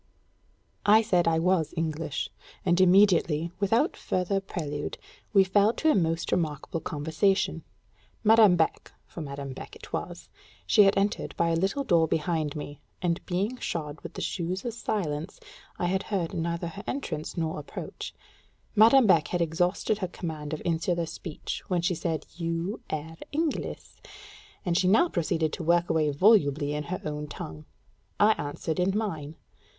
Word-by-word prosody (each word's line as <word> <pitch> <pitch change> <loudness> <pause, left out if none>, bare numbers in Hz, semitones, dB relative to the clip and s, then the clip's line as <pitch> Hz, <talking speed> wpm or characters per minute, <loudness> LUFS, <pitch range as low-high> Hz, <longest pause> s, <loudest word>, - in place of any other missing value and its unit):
I 215 +2 +6
said 180 -6 +2
I 165 -1 +3
was 165 -2 +1
English, 160 -2 -2 0.3
and 175 0 +3
immediately, 175 -4 +4
without 225 - +2
further 185 +2 -1
prelude, 150 -6 -4 0.3
we 195 -2 +6
fell 205 +3 +3
to 315 +4 +2
a - - +2
most 165 -2 0
remarkable 155 -1 -1
conversation. 160 +4 0 0.6
Madame 220 -3 +7
Beck 160 -2 0
(for 170 - -9
Madame 140 -2 -6
Beck - - -9
it - - -13
was; - - -5 0.4
she 200 - +6
had 195 - +3
entered 200 +1 -1
by 170 - +2
a 165 - +2
little 195 +11 0
door 170 -9 +3
behind 155 -1 -1
me, 145 -1 -7 0.2
and 175 -1 -1
being 200 +7 -1
shod 155 -8 -4
with - - -9
the - - -4
shoes 185 +3 -3
of 240 - -2
silence, 185 -7 -3 0.4
I - - -1
had 190 +2 +1
heard 185 -6 -1
neither 170 +1 -2
her 200 +4 -9
entrance 170 - -4
nor 160 -2 -1
approach) 145 - -7 0.6
Madame 230 +4 +7
Beck 170 -6 +4
had 175 - -1
exhausted 175 +6 0
her 185 - -1
command 160 -4 -6
of 155 - -4
insular 170 0 0
speech 160 0 -6
when 175 -2 0
she 180 +1 +2
said 165 -1 -2
"You 170 +4 -3
ayre 160 +1 -5
Engliss," 310 0 -3 0.6
and 175 -2 +1
she 185 0 +3
now 320 - +5
proceeded 160 - 0
to 175 - -4
work 170 +1 +2
away 155 -2 +2
volubly 145 -4 +3
in 150 0 -3
her 180 +4 -4
own 150 0 -4
tongue. 80 - -8 0.5
I 210 +1 +6
answered 150 +3 -3
in 190 +3 +2
mine. 160 -9 -3
170 Hz, 160 wpm, -27 LUFS, 155-195 Hz, 0.6 s, Madame